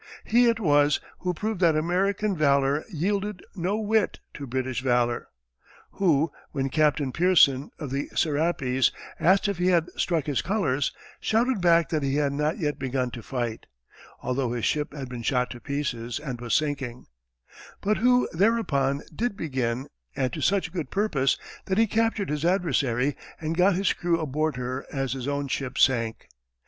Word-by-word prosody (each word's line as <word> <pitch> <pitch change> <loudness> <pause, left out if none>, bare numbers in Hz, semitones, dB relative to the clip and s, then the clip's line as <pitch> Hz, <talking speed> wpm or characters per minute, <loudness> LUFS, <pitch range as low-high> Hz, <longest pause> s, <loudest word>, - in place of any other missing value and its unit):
He 240 +2 +4
it 230 -1 +1
was 145 -6 +3 0.2
who 180 - -1
proved 215 +3 -3
that 165 -3 +5
American 190 +5 +1
valor 140 -1 +2
yielded 195 +3 -2
no 190 +2 -1
whit 220 -1 +1
to 140 -3 -7
British 130 0 -2
valor 120 -2 +1 0.6
who, 165 -5 +2 0.2
when 135 -2 -1
Captain 150 -2 +2
Pearson, 155 -5 +4
of 145 -5 -6
the 140 +1 -2
Serapis, 145 -5 +1 0.3
asked 190 +4 +4
if 200 -3 -2
he 180 - +2
had 170 -2 +2
struck 165 -5 0
his 145 -4 0
colors, 155 -10 0 0.3
shouted 230 -1 +1
back 170 -2 +4
that 155 -2 0
he 135 0 0
had 145 -1 +1
not 150 +5 0
yet 150 -7 -2
begun 130 -1 -1
to 120 - -7
fight, 120 -2 -4 0.6
although 125 -1 -1
his 120 -2 -2
ship 150 -1 0
had 140 -3 -6
been 125 -1 -6
shot 125 +1 0
to 120 - -8
pieces 120 -2 -3
and 135 -5 -6
was 120 -1 0
sinking; 140 -5 -2 0.7
but 210 +2 +1
who 250 +1 +4
thereupon 160 -9 +1
did 230 0 -1
begin, 130 -4 -2 0.3
and 130 -2 -1
to - - -4
such 190 -3 +1
good 170 -5 -3
purpose 160 -10 +1 0.3
that 190 - -1
he 225 - +5
captured 220 -4 0
his 150 0 -2
adversary 145 -8 +1 0.2
and 160 0 -2
got 185 +2 +4
his 195 +2 +2
crew 170 -1 0
aboard 155 0 -1
her 125 +1 -4
as 135 -3 -2
his 130 -1 -5
own 145 0 -1
ship 135 -1 -3
sank. 115 -4 +2
150 Hz, 170 wpm, -26 LUFS, 130-185 Hz, 0.7 s, that